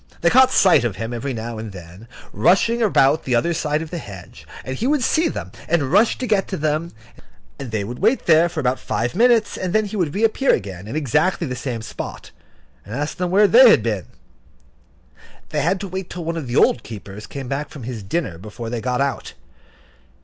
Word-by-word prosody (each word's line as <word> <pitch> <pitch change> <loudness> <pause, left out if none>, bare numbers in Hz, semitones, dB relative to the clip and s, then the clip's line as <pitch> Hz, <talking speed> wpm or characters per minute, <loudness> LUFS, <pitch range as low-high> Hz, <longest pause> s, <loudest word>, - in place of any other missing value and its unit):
They 170 - +3
caught 260 +1 +6
sight 175 -9 +4
of 115 -6 -2
him, 115 +4 -5
every 135 +4 -3
now 115 -1 -5
and 110 -1 -6
then, 90 +4 -12 0.3
rushing 230 +6 +2
about 155 -8 +3
the 125 - 0
other 170 +9 +1
side 155 -1 -1
of 160 - -11
the 175 - -4
hedge, 95 - -12 0.2
and 130 - -4
he 235 - -2
would 290 -2 +1
see 325 +7 +2
them, - - -5 0.2
and 145 -6 +1
rush 210 +5 +4
to 255 - -3
get 210 -5 +1
to 190 - -4
them, 155 +2 -1 0.7
and 130 - -6
they 110 -2 -2
would 120 +5 -7
wait 225 +6 +2
there 165 +1 +5
for 165 - -5
about 130 -2 0
five 120 +1 -2
minutes, 230 0 +3
and 185 -2 -3
then 215 0 +2
he 205 - -6
would 175 -6 -1
reappear 225 +6 +2
again 95 -3 -7
in 115 - -6
exactly 155 - +1
the 125 -3 -4
same 120 -2 -5
spot, - - -8 0.5
and 105 +6 -8
ask 145 +3 -3
them 180 -1 -1
where 200 +4 +5
they 245 +4 +8
had 115 - +5
been. 105 -6 -2 1.4
They - - -1
had 180 +5 +1
to 200 - -4
wait 190 0 -6
till 175 -2 -6
one 165 +1 -2
of 160 -6 -5
the 120 - -4
old 120 - +4
keepers 105 -1 -9
came 135 -2 -7
back 140 +3 -3
from 140 - -10
his 115 -2 -6
dinner 95 - -3
before 110 +4 -8
they 120 -2 -3
got 125 +2 -1
out. 140 -1 -3
150 Hz, 220 wpm, -21 LUFS, 115-185 Hz, 1.4 s, they